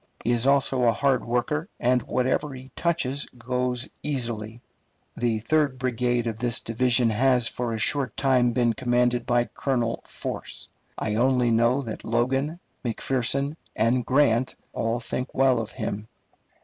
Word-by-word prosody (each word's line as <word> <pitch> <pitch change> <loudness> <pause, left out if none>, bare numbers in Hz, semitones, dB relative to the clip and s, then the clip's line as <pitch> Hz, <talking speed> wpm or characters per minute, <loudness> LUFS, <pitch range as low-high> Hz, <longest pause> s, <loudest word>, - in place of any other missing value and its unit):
He 120 - +1
is 120 +2 +2
also 135 -2 +3
a 115 - +5
hard 130 +2 +1
worker, 150 - -1
and 125 +1 +2
whatever 130 +4 -1
he 130 +1 -11
touches 150 -5 -1
goes 125 +1 -1
easily. 115 -5 -3 0.6
The 115 -2 0
third 145 +2 +1
brigade 125 -1 0
of 115 -1 -3
this 120 -1 0
division 120 0 +2
has 125 +1 +3
for 120 -1 -3
a 115 - -2
short 130 +4 +1
time 125 -3 +3
been 120 -1 +2
commanded 120 -1 +1
by 120 0 +3
Colonel 120 -4 -1
Force. - - -6 0.3
I 105 - -2
only 125 +1 +3
know 120 +4 +3
that 110 -3 -6
Logan, 135 +8 0 0.2
McPherson, 135 +4 0 0.2
and 115 +3 +2
Grant 130 -2 +2 0.2
all 115 +1 -1
think 125 +2 -4
well 130 -2 +4
of 110 - -6
him. 105 +1 -4
125 Hz, 150 wpm, -25 LUFS, 115-130 Hz, 0.6 s, a